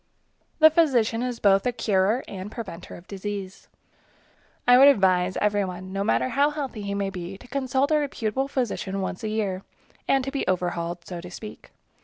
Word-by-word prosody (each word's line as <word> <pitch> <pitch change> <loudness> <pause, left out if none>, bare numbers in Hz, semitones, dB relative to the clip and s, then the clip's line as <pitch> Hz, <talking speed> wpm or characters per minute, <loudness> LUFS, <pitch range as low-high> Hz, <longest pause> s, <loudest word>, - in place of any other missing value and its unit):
The 315 0 +7
physician 250 -8 +2
is 250 -2 -3
both 195 -1 +4
a - - +2
curer 215 +1 +1
and 195 +1 -7
preventor 185 -7 -8
of 175 - -14
disease. 195 -1 -6 1.0
I 245 0 +8
would 275 - +9
advise 185 -7 +3
every 205 -1 +1
one, 185 0 -6
no 195 0 -1
matter 130 - +1
how 285 +1 +3
healthy 280 -7 -5
he 200 0 -3
may 200 -1 -1
be, 185 0 -7
to 250 - -15
consult 265 +2 0
a 305 - +4
reputable 270 -2 -2
physician 210 -7 -2
once 190 +1 -4
a 215 - -2
year, 205 -4 -2 0.5
and 270 -1 +3
to 270 - -4
be 275 - -3
overhauled, 175 -1 -2
so 175 -2 -6
to 180 - -9
speak. 210 +4 -10
205 Hz, 185 wpm, -25 LUFS, 185-255 Hz, 1.0 s, would